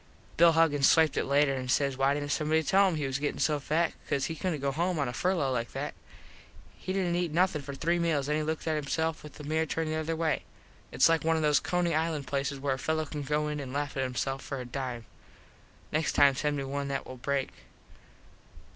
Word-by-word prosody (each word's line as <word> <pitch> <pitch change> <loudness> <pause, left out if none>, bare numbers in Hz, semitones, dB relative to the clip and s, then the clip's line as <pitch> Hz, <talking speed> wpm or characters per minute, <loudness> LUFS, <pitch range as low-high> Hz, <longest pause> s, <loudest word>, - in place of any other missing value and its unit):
Bill 170 0 +6
Huggins 150 -4 +4
swiped 160 -3 +4
it - - 0
later 140 0 +3
and 130 -1 -4
says 140 0 +2
why 135 +2 +2
didnt 145 0 -3
somebody 155 +1 +1
tell 195 +5 +4
him 180 - 0
he 150 -2 -2
was 135 0 -2
gettin 145 0 -2
so 150 -2 +2
fat 160 +4 0 0.2
cause 140 - +1
he 160 - -3
couldnt 165 -1 -2
go 140 0 0
home 175 +4 -1
on 140 -3 0
a 120 - -4
furlo 170 -6 0
like 115 -1 -3
that. - - -4 0.8
He 185 - -6
didnt 185 -2 0
eat 175 -2 -1
nothin 175 -1 +2
for 140 0 -7
three 170 +5 0
meals 155 -5 0
and 150 - +1
then 155 - 0
he - - -5
looked 160 0 -3
at 155 -2 0
hisseif 160 +3 -1
with 150 - -11
the 150 - -10
mirror 160 +2 0
turned 160 +1 -2
the - - -1
other 160 +1 -2
way. 160 -1 0 0.5
Its - - +5
like 165 -2 +2
one 165 0 +2
of 160 - 0
those 150 -1 +4
Coney 175 -1 0
Island 155 -2 -1
places 140 0 -2
where 135 0 -1
a 130 - -5
fello 160 +1 -1
can 150 0 -5
go 150 +2 0
in 150 0 -3
and 130 -2 -6
laff 145 0 -2
at 135 - -1
hisself 135 +2 -2
for 135 - -5
a 125 - -5
dime. 125 -2 -5 0.9
Next 155 +1 0
time 140 -1 +6
send 150 +2 -1
me 140 - -2
one 140 +1 -3
that 135 -1 -3
will 130 - -9
break. 140 +1 -1
150 Hz, 245 wpm, -29 LUFS, 140-160 Hz, 0.9 s, Bill